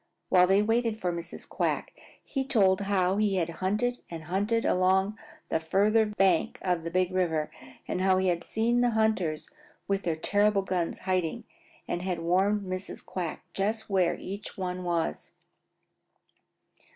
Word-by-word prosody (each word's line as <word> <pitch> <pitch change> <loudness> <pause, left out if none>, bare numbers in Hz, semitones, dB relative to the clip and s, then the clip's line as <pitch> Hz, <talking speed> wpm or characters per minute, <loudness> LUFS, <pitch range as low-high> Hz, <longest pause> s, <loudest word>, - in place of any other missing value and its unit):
While 180 -1 +6
they 195 +2 +4
waited 225 0 +1
for 180 -3 -1
Mrs. 170 0 -7
Quack - - -2 0.3
he 270 - -2
told 205 -7 +3
how 195 -1 +1
he 210 -2 +2
had 170 -2 0
hunted 215 +6 0
and 165 -2 -7
hunted 205 +7 0
along 190 +3 +2 0.3
the 160 - +1
farther 210 +7 +3
bank 195 -5 +2
of 180 -3 0
the 165 - -3
Big 185 +1 +1
River 165 -5 0 0.4
and 185 - -2
how 190 0 +4
he 190 0 +1
had 170 -1 -1
seen 235 +2 +1
the 245 - +3
hunters 195 -8 +1 0.4
with 195 0 0
their 165 -4 -1
terrible 205 +4 +2
guns 180 -3 -2
hiding 185 +4 0 0.4
and 175 - -2
had 180 -1 -2
warned 190 +5 +2
Mrs. 185 0 -6
Quack 180 -2 -5
just 215 +2 -2
where 185 -3 +2
each 200 +2 -7
one 185 -1 -3
was. 170 - -2
190 Hz, 155 wpm, -28 LUFS, 180-210 Hz, 0.4 s, While